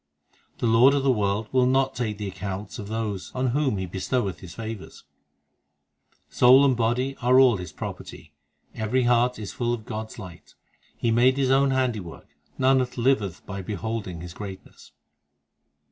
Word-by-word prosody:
The - - -2
Lord 120 +5 +5
of 140 - 0
the 135 - +4
world 105 -1 0
will 130 -1 +3
not 135 +1 +2
take 110 -4 -3
the 105 -1 -4
accounts 95 +1 -6
of 100 - -6
those 110 -3 -4
On 130 0 0
whom 135 -4 0
He 95 - -3
bestoweth 95 +1 -2
His 90 -3 -11
favours. 110 -2 -8 1.2
Soul 130 +3 +6
and 130 -2 +3
body 120 +4 0
are 125 +1 +5
all 125 -5 +5
His 90 -1 -7
property; - - -8 0.4
Every 115 +4 0
heart 120 +1 +2
is 105 -3 -7
full 120 -1 -1
of 110 -2 -12
God 110 +1 -5
s - - -13
light; 90 -6 -12 0.4
He 115 - 0
made 125 +3 +4
His 135 -2 +1
own 135 +1 +4
handiwork 120 -10 -2 0.3
Nanak 130 -1 +2
liveth 115 -8 0
by 100 -1 -6
beholding 100 -2 -5
His 85 0 -8
greatness. 100 -3 -10
115 Hz, 165 wpm, -25 LUFS, 100-130 Hz, 1.2 s, Soul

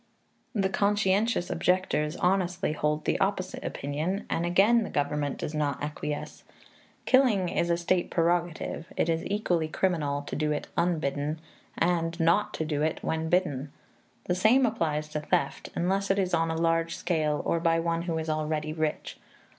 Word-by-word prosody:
The 195 -2 +2
conscientious 200 0 +1
objectors 170 -4 +1
honestly 180 -2 +1
hold 150 0 -1
the - - +1
opposite 195 -1 -1
opinion, 155 +8 -3
and 170 +1 0
again 205 +7 +4
the - - -3
government 145 0 -1
does 150 - -4
not 145 -3 0
acquiesce. 150 0 -5 0.6
Killing 230 -9 +4
is 170 - 0
a 170 - +2
state 175 +1 0
prerogative; 170 -1 -1
it - - +1
is 165 0 0
equally 180 -6 0
criminal 155 -5 0
to - - -6
do 150 0 0
it 150 - -2
unbidden 155 -3 0 0.4
and 170 0 0
not 170 +6 +3
to 160 - -2
do 150 -2 -1
it 155 +1 -1
when 160 0 -1
bidden. 150 -6 0 0.5
The 180 - +1
same 220 +8 +4
applies 155 -9 -1
to 150 - -3
theft, 170 +4 -1
unless 195 +3 0
it 195 - +3
is 185 -2 0
on 165 0 +2
a 160 - -1
large 165 0 +1
scale 155 -4 0
or 170 - +1
by 165 0 +2
one 165 0 0
who 170 -1 -2
is 160 0 -3
already 155 0 -1
rich. 155 -1 -3
165 Hz, 165 wpm, -28 LUFS, 155-185 Hz, 0.6 s, again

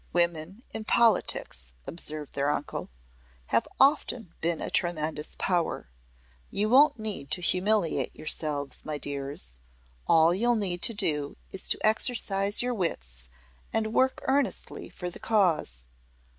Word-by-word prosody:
"Women 175 +5 -1
in 220 - -5
politics," 180 - +1
observed 155 -2 -3
their 140 +1 0
uncle, 145 0 -4 0.6
"have - - +2
often 250 - +2
been 165 0 -1
a - - -5
tremendous 155 -3 -1
power. 175 - -1 0.6
You 210 +2 0
won't 280 +3 +5
need 210 -10 -2
to 165 +4 +2
humiliate 185 0 +1
yourselves, 150 -2 -1
my 155 -1 -4
dears. 140 - -2 0.5
All 165 +1 +5
you'll 240 +6 +2
need 185 -5 -1
to 230 - +3
do 150 -8 +1
is 190 - -1
to - - +1
exercise 215 -2 +4
your 250 0 -1
wits - - -4 0.4
and 220 0 -2
work 260 +1 +1
earnestly 275 +1 -1
for 180 -1 -6
the - - -10
cause. 165 - +1
175 Hz, 130 wpm, -27 LUFS, 150-220 Hz, 0.6 s, won't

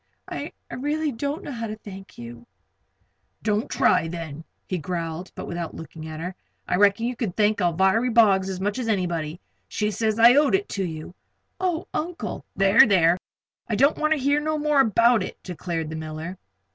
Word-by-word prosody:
"I - - -5 0.2
really 295 +3 -1
don't 280 +6 -3
know - - -6
how 230 -3 -4
to 215 - -5
thank 195 -2 -11
you." 120 0 -10 1.0
"Don't 210 0 0
try, 170 -3 +3
then," 165 -2 -6 0.2
he 185 - -3
growled, 170 +2 -4
but - - -6
without 170 -1 -5
looking 160 0 -9
at 155 0 -7
her. 180 +3 -4 0.3
"I 180 - +1
reckon 205 +3 +4
you 245 +1 -2
can 225 -7 -3
thank 210 +1 +2
Alviry 190 +7 +2
Boggs 200 -5 +4
as 185 -1 -4
much 205 +5 -1
as 245 - -3
anybody. 175 -6 -1 0.3
She 210 0 -1
says 220 +1 0
I 235 +2 +8
owed 290 +5 +4
it 405 +2 -1
to 195 - -2
you." 160 -1 -6 0.5
"Oh, 355 -3 -1
Uncle 340 +2 -4
" - - -49
"There, 195 +4 +6
there! 175 -3 +4 0.5
I 220 - -1
don't 280 +8 +3
wanter 305 0 +2
hear 285 +2 +2
no 310 +1 -1
more 300 -1 +2
about 230 0 +4
it," - - -5
declared 170 -3 -4
the - - -4
miller. 160 +3 -6
200 Hz, 185 wpm, -24 LUFS, 170-245 Hz, 1.0 s, I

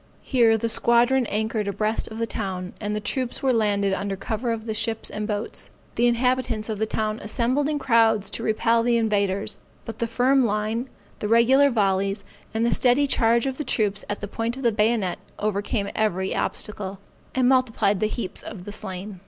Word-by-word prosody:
Here 230 -4 +4
the 230 - -1
squadron 235 +2 +3
anchored 220 0 -1
abreast 215 +3 -1
of 220 - -8
the 230 - 0
town, 185 -5 -4
and 210 0 -2
the - - -1
troops 250 +4 -3
were 265 -1 +3
landed 200 -3 +1
under 195 +1 -2
cover 225 +4 -3
of 225 -1 -4
the 220 - -2
ships 225 0 -2
and 210 0 -3
boats. 210 +1 -4 0.2
The 240 - +2
inhabitants 240 -2 0
of 215 -2 -3
the 220 - 0
town 215 0 -2
assembled 255 +7 0
in 300 - 0
crowds 225 -6 +3
to - - -4
repel 230 +1 +2
the 235 0 +2
invaders; 200 -3 0 0.3
but 225 - -7
the 235 - 0
firm 255 +3 +3
line, 220 +3 -1 0.3
the 210 - -2
regular 250 +5 +5
volleys, 200 -3 +1 0.3
and 225 +1 0
the 235 - +2
steady 255 +3 +3
charge 235 -3 +2
of 265 +1 -3
the - - -1
troops 210 -6 0
at 205 - -3
the 205 - -4
point 230 +4 -3
of 270 - -7
the 235 - +4
bayonet, 210 -3 +1 0.2
overcame 205 0 -1
every 190 -3 0
obstacle, 200 -2 -2 0.4
and 255 -1 +3
multiplied 240 -6 +2
the 215 - +2
heaps 215 -3 -5
of 190 -5 -9
the 205 - -6
slain. 195 -1 -6
220 Hz, 195 wpm, -24 LUFS, 205-235 Hz, 0.4 s, regular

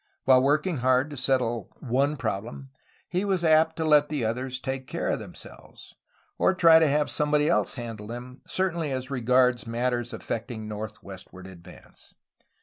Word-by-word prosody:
While 130 -1 +5
working 150 +5 +1
hard 130 +3 +2
to - - -6
settle 125 -5 -1
some 125 - -10
one 140 +5 +1
problem, 120 +5 -5 0.4
he 180 +2 -1
was 190 -4 0
apt 160 0 +4
to 160 - -2
let 150 -1 +4
the 145 -6 -2
others 125 +3 -3
take 130 0 -5
care - - -3
of - - 0
themselves, - - -12 0.5
or 190 - +3
try 165 -3 +7
to 160 - +4
have 150 +1 +1
somebody 150 0 +1
else 105 -3 +1
handle 115 -4 -7
them, 125 +3 -9
certainly 170 -5 -1
as 130 +1 -4
regards 125 -1 +2
matters 120 0 -1
affectiag 115 0 -5
northwestward 105 -3 -8
advance. 90 -3 -15
130 Hz, 160 wpm, -26 LUFS, 115-150 Hz, 0.5 s, try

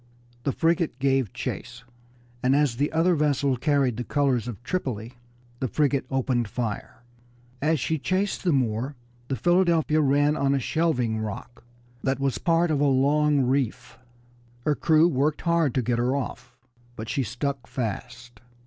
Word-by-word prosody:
The 140 - +2
frigate 165 -2 +1
gave 135 -5 +1
chase, 125 0 -6 0.6
and 130 +2 +3
as 145 -5 +2
the 145 +3 0
other 165 +3 +3
vessel 145 -3 +1
carried 135 -3 +1
the 120 - -2
colors 135 -4 0
of 120 -1 -7
Tripoli, 125 - -3 0.5
the 130 - -1
frigate 140 0 0
opened 125 -3 0
fire. 115 +1 -5 0.6
As 155 +1 +2
she 160 +5 -1
chased 190 +6 -1
the 180 - +2
Moor 130 0 0 0.3
the 135 - -1
Philadelphia 170 - +3
ran 145 +1 +3
on 140 -2 +1
a - - +1
shelving 125 -6 0
rock 110 +3 -6 0.4
that 135 -1 0
was 135 -1 -1
part 170 -1 +2
of 150 - +1
a - - +4
long 145 +2 +3
reef. 125 -2 -1 0.7
Her 150 - +3
crew 160 +2 +4
worked 150 -1 0
hard 170 -6 +1
to 130 - +1
get 120 0 0
her 125 +3 +1
off, 125 -2 -5 0.4
but 110 -2 -7
she 140 - -1
stuck 130 0 -3
fast. 120 -1 -5
135 Hz, 160 wpm, -25 LUFS, 125-150 Hz, 0.7 s, a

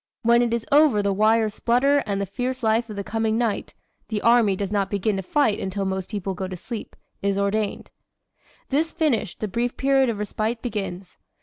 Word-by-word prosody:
When 235 +1 +5
it 240 -1 +1
is 235 -1 -1
over 285 -8 +5
the 200 0 +1
wires 215 +1 +3
splutter 265 +6 +2
and 200 -1 -1
the 200 - -1
fierce 250 +5 -4
life 225 +1 +2
of 210 - -6
the 200 - -4
coming 220 +1 -1
night 230 -3 -2 0.3
the 215 -2 -2
Army 230 -4 +4
does 195 0 -3
not 200 -2 0
begin 205 +1 0
to - - -2
fight 220 - +1
until 195 +1 -3
most 190 -1 -3
people 200 -3 -3
go 190 +1 -4
to 185 -1 -6
sleep 225 +5 -7 0.3
is 200 0 0
ordained. 200 +1 -1 0.8
"This 310 +4 +1
finished, 270 - -1
the 215 - -1
brief 235 +5 -2
period 270 -1 +3
of 225 - -2
respite 215 +3 -2
begins. 195 -5 -5
215 Hz, 200 wpm, -24 LUFS, 200-240 Hz, 0.8 s, When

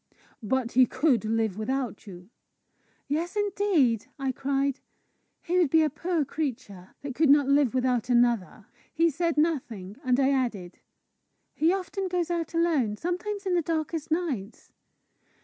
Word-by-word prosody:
"But 245 +2 -1
he 255 0 +5
could 260 -5 +1
live 220 -2 -1
without 250 -2 -3
you?" 180 +2 -11 0.8
"Yes, 325 +7 -2
indeed!" 390 - +1
I 270 -2 -1
cried. 275 +1 -1 0.6
"He 360 +2 +1
would 340 -5 +3
be 320 +2 +4
a 305 - 0
poor 325 +1 -1
creature 230 - -5
that 280 -2 -4
could 305 +3 +2
not 285 -1 +5
live 280 -3 +3
without 250 -2 0
another!" 240 -5 +1 0.3
He 330 0 +2
said 335 +1 -1
nothing, 240 - -1
and 255 0 +2
I 270 0 +3
added, 230 -10 -2 0.7
"He 320 +3 +2
often 385 +1 -2
goes 350 -2 -1
out 335 -1 -3
alone 300 -11 +1
sometimes 380 - -3
in 375 - 0
the 350 - +3
darkest 320 -1 -3
nights." 290 - -3
280 Hz, 150 wpm, -27 LUFS, 240-335 Hz, 0.8 s, he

